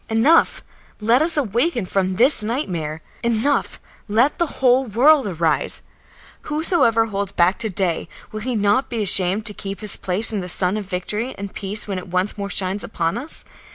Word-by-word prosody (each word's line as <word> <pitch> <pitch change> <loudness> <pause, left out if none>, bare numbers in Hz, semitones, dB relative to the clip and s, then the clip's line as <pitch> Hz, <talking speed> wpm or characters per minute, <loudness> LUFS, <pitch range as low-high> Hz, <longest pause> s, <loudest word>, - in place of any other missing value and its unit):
Enough, 300 - +3 0.4
let 230 +5 +3
us 320 0 +3
awaken 240 - 0
from 185 0 -1
this 250 +4 +4
nightmare! 175 - -3 0.2
Enough, 235 +5 0 0.3
let 230 +7 +2
the 345 - +2
whole 260 0 +3
world 260 +4 +4
arise! 160 -6 -1 0.7
Whosoever 300 -8 +2
holds 200 -2 -3
back 180 +1 +2
to 220 - -2
day, 185 -3 -2 0.2
will 215 - -5
he 250 +2 -2
not 210 +5 +1
be 230 -3 -2
ashamed 195 +2 +3
to 210 - -2
keep 195 0 -7
his 210 -2 -1
place 195 +5 +1
in 210 - -1
the 180 -1 -6
sun 180 +2 0
of 210 -1 -4
victory 210 +7 -3
and 200 0 -7
peace 205 +2 -3
when 195 -2 -3
it 185 - -11
once 185 +3 -1
more 200 -1 -5
shines 190 +1 -1
upon 165 -5 -2
us? 270 +7 -8
210 Hz, 180 wpm, -21 LUFS, 190-245 Hz, 0.7 s, this